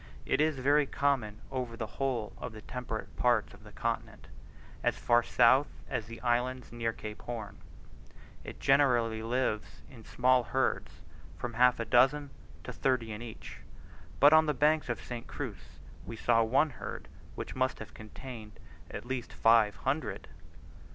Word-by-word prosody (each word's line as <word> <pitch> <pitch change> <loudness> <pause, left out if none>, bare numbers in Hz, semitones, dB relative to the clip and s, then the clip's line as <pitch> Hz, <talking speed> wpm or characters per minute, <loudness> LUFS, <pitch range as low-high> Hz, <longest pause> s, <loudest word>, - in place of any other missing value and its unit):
It 140 - +2
is 155 -2 +2
very 145 +2 +3
common 120 -8 0
over 125 -3 -3
the 115 - -3 0.2
whole 125 -6 -1
of 125 - -6
the 110 0 -10
temperate 125 -3 -6
parts 120 -4 +2
of - - -16
the - - -13
continent, - - -4 0.5
as - - +1
far 120 0 +4
south 125 +4 +4 0.2
as - - -3
the 115 0 -9
islands 125 +1 0
near 115 -1 -1
Cape 105 -1 -8
Horn. 110 -4 -6 0.9
It - - -9
generally 120 -5 +3
lives 115 -2 -2
in 115 -4 -13
small 125 +2 +2
herds 130 +2 0
of - - -20 0.4
from 120 -1 -4
half 125 +1 +4
a 115 - -1
dozen 135 +4 +3 0.3
to - - -6
thirty 125 -4 0
in 105 +1 -6
each; 115 - -9 0.6
but 145 +2 +8
on 155 0 +6
the 150 - +1
banks 155 -1 +2
of 120 - 0
the - - -13
St. 120 -1 -6
Cruz 105 -11 -7 0.3
we 115 - -7
saw 115 +1 +3
one 135 +7 +3
herd 120 - -7 0.3
which - - -6
must 130 0 0
have - - -10
contained 110 0 -9 0.4
at - - -7
least 125 -1 -4
five 115 -2 +4
hundred. 130 -7 -3
120 Hz, 165 wpm, -31 LUFS, 115-130 Hz, 0.9 s, but